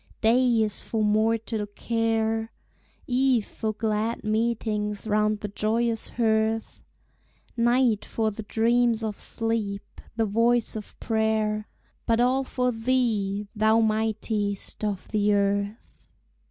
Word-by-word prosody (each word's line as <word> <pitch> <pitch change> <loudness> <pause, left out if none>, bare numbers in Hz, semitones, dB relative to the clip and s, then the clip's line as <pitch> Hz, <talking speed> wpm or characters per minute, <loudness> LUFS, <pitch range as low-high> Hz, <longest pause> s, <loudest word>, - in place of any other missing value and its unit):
Day 235 0 +4
is 210 -2 -2
for 220 -2 -2
mortal 220 0 +1
care, 225 +1 -1 0.5
Eve 255 -3 +2
for 220 - -3
glad 220 +1 -2
meetings 215 -2 -1
round 210 0 +1
the 210 - -3
joyous 225 +3 0
hearth, 220 -1 0 0.7
Night 240 -2 +2
for 220 -1 -1
the 215 - -7
dreams 230 +1 +2
of 215 -2 -2
sleep, 220 -3 -3
the 225 -1 +1
voice 230 +3 +2
of 215 -1 -8
prayer 220 -1 0 0.4
But 230 0 +3
all 255 +2 +3
for 250 -1 -1
thee, 225 -4 0
thou 220 +1 +4
mightiest 215 -2 -1
of 205 -3 -2
the 210 -1 +2
earth. 200 +2 -2
220 Hz, 115 wpm, -26 LUFS, 210-230 Hz, 0.7 s, Day